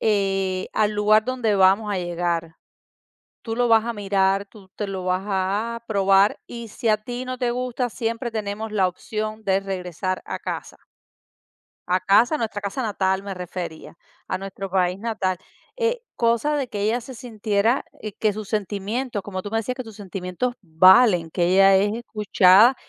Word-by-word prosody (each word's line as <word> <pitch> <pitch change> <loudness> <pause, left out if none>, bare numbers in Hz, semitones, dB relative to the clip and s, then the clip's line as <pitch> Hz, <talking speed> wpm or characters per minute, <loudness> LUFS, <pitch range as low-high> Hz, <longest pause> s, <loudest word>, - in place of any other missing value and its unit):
Eh, 195 -3 0
al 210 -1 +2
lugar 210 +1 +4
donde 245 -4 0
vamos 195 +2 +4
a 195 - -1
llegar, 170 -2 -2 0.9
tú 225 -1 -4
lo 245 +1 +2
vas 225 -1 +4
a 235 - -2
mirar, 195 -1 +1
tú 200 -2 -16
te 210 - -3
lo 190 -1 -4
vas 185 +1 0
a 205 +4 -1
probar 195 -1 +3
y 235 -1 -8
si 230 +3 -4
a 215 - +4
ti 240 +4 -6
no 255 0 -4
te 245 -1 0
gusta 250 0 -2
siempre 230 +1 -3
tenemos 215 0 -4
la 195 -3 +2
opción 215 +4 -5
de 195 -2 +2
regresar 185 -1 -4
a - - -5
casa". - - -6 1.1
A 185 +1 +2
casa, 215 +10 +4
nuestra 220 -6 -3
casa 200 +6 -3
natal 190 -3 0
me 200 0 -5
refería, 180 -3 -7 0.3
a - - -2
nuestro 195 0 -6
país 180 0 +1
natal, 200 -4 -2 0.4
eh, 475 0 0 0.2
cosa 235 +6 +1
de 280 -3 -1
que 205 - -5
ella 225 +4 +1
se 255 +2 -10
sintiera 225 -1 0 0.3
que 215 -1 +2
sus 210 -1 -7
sentimientos 210 +3 -2
como 190 -2 -5
tú 205 - -7
me 225 - +2
decías: 250 +3 -3
"Que 255 - -5
tus 225 -2 -11
sentimientos 195 +4 -4
valen", 180 +1 +5
que 175 - 0
ella 195 +2 +6
es 205 +2 +2
escuchada, 215 0 +4
205 Hz, 175 wpm, -23 LUFS, 190-230 Hz, 1.1 s, ella